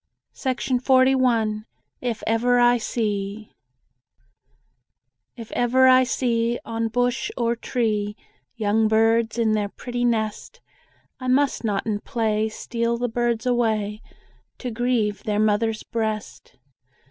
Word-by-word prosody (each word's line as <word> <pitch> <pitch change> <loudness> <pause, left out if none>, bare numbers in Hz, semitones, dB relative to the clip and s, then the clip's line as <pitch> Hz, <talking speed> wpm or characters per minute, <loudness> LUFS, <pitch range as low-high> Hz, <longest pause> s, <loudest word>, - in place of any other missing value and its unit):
JANE 260 -1 -1
TAYLOR 250 -5 +2 0.3
IF 240 -3 -3
EVER 245 +2 +2
I 240 0 +4
SEE 210 -2 -3 1.8
If 230 -2 -9
ever 255 +2 +3
I 255 0 +7
see, 235 -1 0
On 225 0 -2
bush 245 +3 0
or 235 -1 +1
tree, 215 -4 -1 0.4
Young 220 0 +2
birds 225 +1 +2
in 225 -2 +2
their 210 -1 0
pretty 245 +3 -5
nest, 220 -3 -1 0.6
I 255 - -5
must 270 +1 +2
not 205 -3 -1
in 210 -2 -1
play, 220 -3 -1
Steal 235 +1 -2
the 245 +1 -1
birds 235 0 -1
away, 220 -4 0 0.6
To 250 - -5
grieve 230 -3 0
their 210 -1 -2
mother's 215 +1 +1
breast. 220 -2 -4
230 Hz, 120 wpm, -23 LUFS, 215-245 Hz, 1.8 s, I